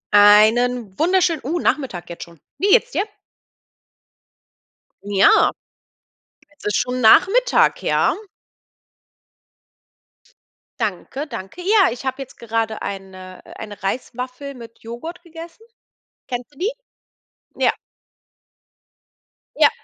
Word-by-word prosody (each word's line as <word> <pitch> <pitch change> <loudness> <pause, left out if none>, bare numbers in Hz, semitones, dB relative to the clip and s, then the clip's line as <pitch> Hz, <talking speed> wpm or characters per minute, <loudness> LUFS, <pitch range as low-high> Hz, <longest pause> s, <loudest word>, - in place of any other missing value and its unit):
Einen 215 +1 +5
wunderschönen 345 -2 +2
uh, 315 +7 -2
Nachmittag 255 - -1
jetzt 170 - -9
schon. 170 -2 -16 0.2
Wie 390 - +1
geht 470 +5 +6
es - - -24
dir? 390 - 0 2.0
Ja, 200 -1 +4 1.1
es - - -16
ist 210 - +1
schon 250 0 -1
Nachmittag, 390 - +4
ja. - - +2 2.6
Danke, 230 - -3
danke. 195 - -8
Ja, 390 - +4
ich 245 +3 -8
habe 260 +1 -3
jetzt 265 - -10
gerade 225 -1 -3
eine 185 -1 -8
äh, - - -13
eine 210 -3 -9
Reiswaffel 250 +6 -4
mit 230 -2 -13
Joghurt 240 +11 -8
gegessen. 335 +4 -12 0.6
Kennst 250 +2 -6
du - - -23
die? 405 +6 0 0.8
Ja. - - +2 1.8
Ja. - - +6
250 Hz, 105 wpm, -20 LUFS, 210-330 Hz, 2.6 s, geht